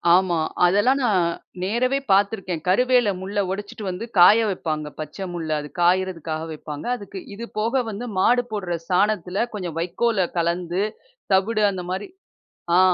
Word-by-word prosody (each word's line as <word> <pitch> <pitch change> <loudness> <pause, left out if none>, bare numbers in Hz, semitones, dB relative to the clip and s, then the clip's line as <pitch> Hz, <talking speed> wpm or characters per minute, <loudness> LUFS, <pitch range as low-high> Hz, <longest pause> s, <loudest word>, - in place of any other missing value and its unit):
ஆமா. 180 -3 +2 0.3
அதெல்லாம் 205 +9 +3
நான் 185 -7 +3 0.4
நேரவே 250 +7 +1
பார்த்துருக்கேன். 195 -4 +1
கருவேல 245 +2 +4
முள்ள 200 +2 -3
ஒடச்சிட்டு 205 +2 -6
வந்து 185 +5 -4
காய 205 +6 +8
வைப்பாங்க. 155 -5 -3
பச்சை 155 +6 -5
முள்ள. 165 -2 -4
அது 150 - -9
காயிறதுக்காக 175 -3 +1
வைப்பாங்க. 150 -1 -7
அதுக்கு 200 -3 -8 0.2
இது 235 +3 -6
போக 235 +4 +1
வந்து 220 +4 -5
மாடு 245 +6 +4
போடுற 185 -5 -2
சாணத்தில 190 +2 +1
கொஞ்சம் 175 -5 -5
வைக்கோல 190 +2 +1
கலந்து 175 +2 0 0.5
தவிடு 210 +3 +2
அந்தமாரி 185 +1 -4 0.7
ஆ - - +7
190 Hz, 135 wpm, -23 LUFS, 175-215 Hz, 0.7 s, காய